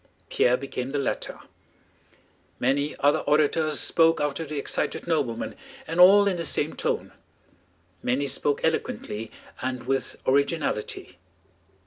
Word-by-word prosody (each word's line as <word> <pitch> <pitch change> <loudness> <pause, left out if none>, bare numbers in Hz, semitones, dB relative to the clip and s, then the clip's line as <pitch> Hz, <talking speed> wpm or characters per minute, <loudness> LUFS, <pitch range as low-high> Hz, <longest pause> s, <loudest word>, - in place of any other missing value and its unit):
Pierre 125 +1 +3
became 130 0 -5
the - - 0
latter. 140 - -3 1.2
Many 140 +4 0
other 145 +2 +4
orators 150 +1 +1
spoke 165 -1 +3
after 150 +2 -1
the 150 -1 -6
excited 140 - -2
nobleman, 140 -9 -1 0.3
and 165 - -4
all 200 +3 +8
in 190 -3 0
the 170 - -3
same 155 - -1
tone. - - -2 0.9
Many 130 +3 0
spoke 140 +1 -1
eloquently 110 -8 -2 0.3
and 125 -1 -3
with 135 0 -2
originality. 140 -4 -1
145 Hz, 120 wpm, -25 LUFS, 130-160 Hz, 1.2 s, all